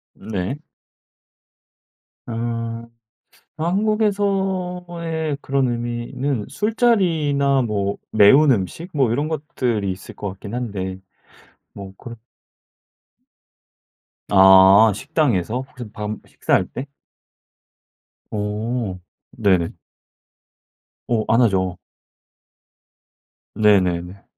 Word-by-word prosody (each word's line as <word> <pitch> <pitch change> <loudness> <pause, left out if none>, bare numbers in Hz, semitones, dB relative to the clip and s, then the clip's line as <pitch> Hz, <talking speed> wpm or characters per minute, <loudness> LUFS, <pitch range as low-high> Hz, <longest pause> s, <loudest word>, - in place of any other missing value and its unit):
네. 100 +4 -4 1.7
아. 115 0 -4 0.7
한국에서의 180 -4 -1
그런 135 -1 0
의미는 120 +1 -3
술자리나 160 - +2
뭐 100 -4 -1
매운 135 +8 +6
음식? 120 - -2
뭐 135 -6 +2
이런 145 +5 -1
것들이 125 -9 -2
있을 95 - -12
것 100 - -5
같긴 100 +3 -9
한데. 100 -6 -4 0.7
뭐 95 -1 -9
그런 120 -3 -9 2.1
아. 95 +2 +7
식당에서? 125 - 0
혹시 120 -5 -10
밥 105 -1 -5 0.2
식사 - - -3
할 - - +4
때? 130 - -6 1.5
어. 105 -1 -3 0.3
네네. 95 -8 +1 1.4
어. 115 -2 +1
안 115 +3 +4
하죠. 95 -5 +1 1.8
네네네. 95 -3 +2
120 Hz, 145 characters per minute, -21 LUFS, 100-150 Hz, 2.1 s, 아